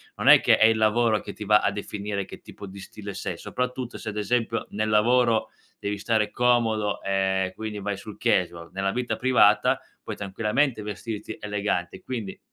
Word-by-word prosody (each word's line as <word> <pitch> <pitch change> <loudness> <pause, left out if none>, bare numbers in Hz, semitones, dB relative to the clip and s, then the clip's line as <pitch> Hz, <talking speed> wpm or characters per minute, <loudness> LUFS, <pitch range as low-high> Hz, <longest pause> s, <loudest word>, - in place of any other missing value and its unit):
non - - +2
è - - +10
che - - +4
è 110 - +6
il 110 0 +3
lavoro 110 0 +3
che 100 - -8
ti 105 - -8
va 105 +1 +5
a - - +1
definire 100 0 -4
che 95 - -11
tipo 100 - -11
di 100 +1 -10
stile 100 +1 -8
sei, - - -4
soprattutto 125 -1 -4
se, - - -10
ad 105 - -6
esempio, 115 +2 -1
nel 110 +1 -2
lavoro 115 +2 +3 0.3
devi 100 0 -3
stare 105 +1 0
comodo, 115 -4 +1
ehm, 95 -1 0
quindi 110 0 -5
vai 100 0 -3
sul 105 +1 -10
casual. 85 -2 0
Nella 95 0 -1
vita 125 -1 -2
privata 130 -1 +4 0.2
puoi - - -6
tranquillamente 105 +6 0
vestirti 105 +1 -6
elegante 105 -4 -2
quindi 115 -7 -5
105 Hz, 180 wpm, -25 LUFS, 100-115 Hz, 0.3 s, è